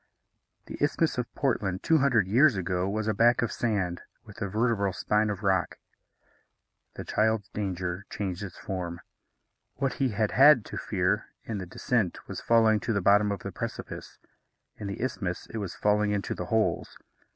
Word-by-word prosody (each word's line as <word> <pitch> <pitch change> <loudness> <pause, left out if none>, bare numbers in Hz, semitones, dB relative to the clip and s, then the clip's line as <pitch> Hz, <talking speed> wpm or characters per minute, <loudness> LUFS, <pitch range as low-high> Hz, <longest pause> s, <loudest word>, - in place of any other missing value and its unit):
The - - -8
Isthmus 145 -1 +1
of 120 - -3
Portland 100 -9 -1
two 160 -1 +4
hundred 125 -8 +3
years 125 +6 +5
ago 90 0 -1
was 110 +1 -2
a 110 - +2
back 120 +4 +4
of 120 - -1
sand, 95 -7 -1 0.2
with 105 -2 -13
a 100 - 0
vertebral 105 -1 +1
spine 105 +3 +1
of 105 0 -4
rock. 95 -3 +1 1.2
The - - -6
child's 110 -2 0
danger 95 -1 -4
changed 95 -2 -4
its 100 -4 -7
form. 90 -3 -5 0.7
What 135 -2 -1
he 135 -2 0
had 105 -1 0
had 135 -4 +7
to - - -7
fear - - 0 0.2
in 110 -3 -4
the 90 - -6
descent 105 0 -1
was - - -6
falling 110 -2 +4
to 115 - -2
the 100 - +1
bottom 105 +2 +4
of 100 - -4
the - - -5
precipice; - - -6 0.6
in 105 - -6
the 100 +4 -4
isthmus, 100 -8 -3
it - - -3
was 95 -4 -5
falling 105 0 +2
into 100 -1 -1
the - - -5
holes. 110 -7 0
105 Hz, 175 wpm, -28 LUFS, 95-115 Hz, 1.2 s, had